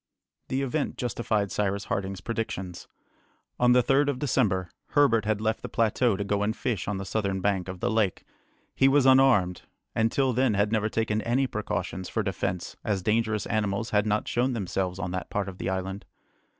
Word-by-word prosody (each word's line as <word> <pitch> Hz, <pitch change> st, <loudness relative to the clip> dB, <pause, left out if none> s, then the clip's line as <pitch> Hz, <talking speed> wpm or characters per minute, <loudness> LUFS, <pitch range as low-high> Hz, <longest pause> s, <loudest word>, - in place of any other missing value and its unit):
The 135 Hz, +1 st, -1 dB
event 140 Hz, +3 st, -2 dB
justified 110 Hz, -4 st, -1 dB
Cyrus 100 Hz, -1 st, -1 dB
Harding's 95 Hz, -1 st, -3 dB
predictions. 95 Hz, -5 st, -4 dB, 0.7 s
On 125 Hz, 0 st, +5 dB
the 125 Hz, 0 st, +5 dB
3rd 135 Hz, +4 st, +3 dB
of 140 Hz, -3 st, 0 dB
December, 105 Hz, -, 0 dB, 0.2 s
Herbert 115 Hz, -7 st, +4 dB
had 110 Hz, -1 st, +1 dB
left 110 Hz, +1 st, -1 dB
the -, -, -6 dB
plateau 115 Hz, 0 st, +2 dB
to 100 Hz, -, -2 dB
go 100 Hz, 0 st, 0 dB
and 105 Hz, +2 st, 0 dB
fish 110 Hz, -8 st, -2 dB
on 100 Hz, -1 st, -1 dB
the 95 Hz, -, -5 dB
southern 100 Hz, -2 st, -1 dB
bank 95 Hz, -1 st, 0 dB
of 95 Hz, -1 st, -7 dB
the 120 Hz, -, +1 dB
lake. 110 Hz, -4 st, +1 dB, 0.5 s
He 135 Hz, -, +4 dB
was 135 Hz, 0 st, +4 dB
unarmed, 130 Hz, -9 st, +5 dB, 0.3 s
and 115 Hz, 0 st, +2 dB
till 135 Hz, -2 st, +1 dB
then 130 Hz, -3 st, +2 dB
had 105 Hz, +1 st, +1 dB
never 110 Hz, -1 st, +1 dB
taken 110 Hz, -1 st, 0 dB
any 125 Hz, +4 st, +1 dB
precautions 95 Hz, -5 st, -3 dB
for 110 Hz, -, -1 dB
defence 95 Hz, -2 st, -3 dB
as 100 Hz, -3 st, -1 dB
dangerous 110 Hz, 0 st, +1 dB
animals 105 Hz, 0 st, -1 dB
had 105 Hz, 0 st, +2 dB
not 105 Hz, 0 st, 0 dB
shown 125 Hz, +2 st, +1 dB
themselves 95 Hz, -4 st, -2 dB
on 90 Hz, -2 st, -3 dB
that 90 Hz, 0 st, -4 dB
part 100 Hz, -1 st, -2 dB
of 95 Hz, -1 st, -8 dB
the -, -, -2 dB
island. 95 Hz, +1 st, -3 dB
105 Hz, 190 wpm, -27 LUFS, 95-120 Hz, 0.7 s, On